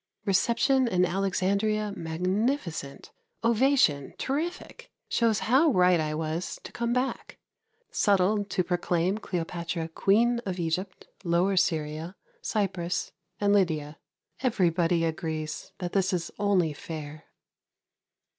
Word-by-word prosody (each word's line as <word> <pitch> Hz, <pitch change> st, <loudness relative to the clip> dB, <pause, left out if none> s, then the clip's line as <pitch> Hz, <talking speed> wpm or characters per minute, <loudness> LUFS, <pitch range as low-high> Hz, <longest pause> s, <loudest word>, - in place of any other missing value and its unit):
Reception 235 Hz, +6 st, +3 dB
in 180 Hz, -5 st, +3 dB
Alexandria 200 Hz, +3 st, 0 dB
magnificent. 180 Hz, -, -2 dB, 0.3 s
Ovation 230 Hz, -, +3 dB
terrific. 320 Hz, +7 st, -4 dB, 0.2 s
Shows 225 Hz, -2 st, +2 dB
how 270 Hz, +8 st, +4 dB
right 180 Hz, -, +4 dB
I 155 Hz, -1 st, -1 dB
was 160 Hz, +2 st, -3 dB
to -, -, -9 dB
come 235 Hz, 0 st, -2 dB
back. 250 Hz, +2 st, -2 dB, 0.5 s
Settled 200 Hz, +1 st, +2 dB
to 185 Hz, -, +1 dB
proclaim 175 Hz, +2 st, 0 dB
Cleopatra 170 Hz, -3 st, -3 dB
Queen 230 Hz, +8 st, +3 dB
of 190 Hz, -6 st, -4 dB
Egypt, 180 Hz, +3 st, -3 dB, 0.2 s
Lower 175 Hz, +2 st, +2 dB
Syria, 160 Hz, -1 st, 0 dB, 0.3 s
Cyprus 190 Hz, -, -1 dB, 0.3 s
and 205 Hz, 0 st, +3 dB
Lydia. 160 Hz, -6 st, +1 dB, 0.4 s
Everybody 175 Hz, -, +2 dB
agrees 160 Hz, -1 st, -4 dB
that 180 Hz, -1 st, -4 dB
this 190 Hz, -1 st, +1 dB
is 170 Hz, -2 st, -2 dB
only 185 Hz, -6 st, +2 dB
fair. 155 Hz, 0 st, -8 dB
185 Hz, 110 wpm, -27 LUFS, 165-215 Hz, 0.5 s, how